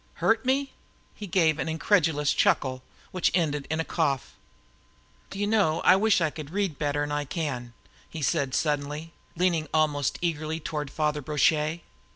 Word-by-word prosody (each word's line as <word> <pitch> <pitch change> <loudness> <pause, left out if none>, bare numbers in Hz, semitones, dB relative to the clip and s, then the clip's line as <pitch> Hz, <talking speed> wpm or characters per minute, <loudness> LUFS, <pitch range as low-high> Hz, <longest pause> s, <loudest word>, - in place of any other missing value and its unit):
Hurt 225 0 +2
me!" 270 +1 +1 0.4
He 205 - -8
gave 160 -4 +2
an - - -2
incredulous 160 -3 +2
chuckle, 135 -10 +1 0.3
which 185 -2 +1
ended 150 -5 0
in 160 +1 -1
a 165 - -1
cough. 140 -6 -1 1.0
"Do - - -8
you 205 - 0
know, 205 -7 +2
I - - +6
wish 205 -1 +3
I 155 -2 +1
could 150 -2 -8
read 190 -4 -2
better 145 -1 0
'n 145 - -4
I 145 0 -1
can!" 130 -6 -4 0.4
he 160 -3 -6
said 140 -4 0
suddenly, 150 +2 -2 0.2
leaning 170 -3 +1
almost 150 -3 +1
eagerly 160 -2 -2
toward 150 -2 -4
Father 150 +1 -1
Brochet. 155 +3 +1
155 Hz, 165 wpm, -27 LUFS, 145-175 Hz, 1.0 s, I